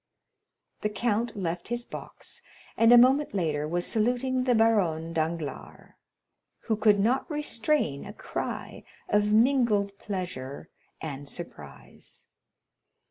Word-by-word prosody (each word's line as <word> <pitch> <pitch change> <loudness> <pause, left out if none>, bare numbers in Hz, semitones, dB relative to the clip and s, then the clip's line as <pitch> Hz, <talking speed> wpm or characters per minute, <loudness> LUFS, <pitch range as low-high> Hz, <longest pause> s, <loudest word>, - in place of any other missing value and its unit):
The 210 - 0
count 230 +2 -1
left 175 -2 -3
his 240 +1 -3
box, - - -7 0.3
and 230 +1 +5
a 245 - +10
moment 260 +1 +5
later 150 -5 0
was 175 +2 -1
saluting 250 +3 +1
the 250 -2 +3
Baronne 180 -8 +2
Danglars, 160 -1 -4 0.7
who 220 - 0
could 210 -1 +4
not 245 - +1
restrain 295 - 0
a - - -7
cry - - -5 0.3
of 210 0 +2
mingled 220 -4 +3
pleasure 175 -9 -5 0.3
and 145 -2 -6
surprise. 75 - -9
210 Hz, 115 wpm, -28 LUFS, 165-240 Hz, 0.7 s, a